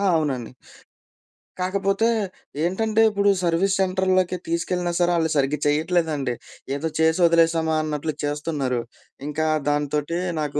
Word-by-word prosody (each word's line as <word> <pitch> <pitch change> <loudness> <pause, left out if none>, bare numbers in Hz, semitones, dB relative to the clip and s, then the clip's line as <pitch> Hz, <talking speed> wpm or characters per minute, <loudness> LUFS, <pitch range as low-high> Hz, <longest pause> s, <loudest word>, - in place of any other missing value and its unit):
అవునండి. 135 -7 -1 1.1
కాకపోతే 195 +3 +1 0.6
ఏంటంటే 215 +5 +1
ఇప్పుడు 200 -1 +2
సర్వీస్ 175 +3 +2
సెంటరులోకి 185 -1 +1
తీసుకెళ్ళినా 175 +1 -1
సరే 175 0 +3
ఆళ్ళు 160 -1 +1
సరిగ్గా 140 +1 +1
చేయట్లేదండి. 150 -3 +1 0.4
ఏదో 145 +3 -2
చేసి 160 +2 +3
ఒదిలేసామా! 165 -1 +3
అన్నట్లు 155 0 -2
చేస్తున్నారు. 145 -4 -1 0.5
ఇంకా 150 +1 -1 0.2
దాంతోటి 145 +2 -1 0.2
నాకు 150 -1 -2
165 Hz, 110 wpm, -23 LUFS, 150-185 Hz, 1.1 s, సరే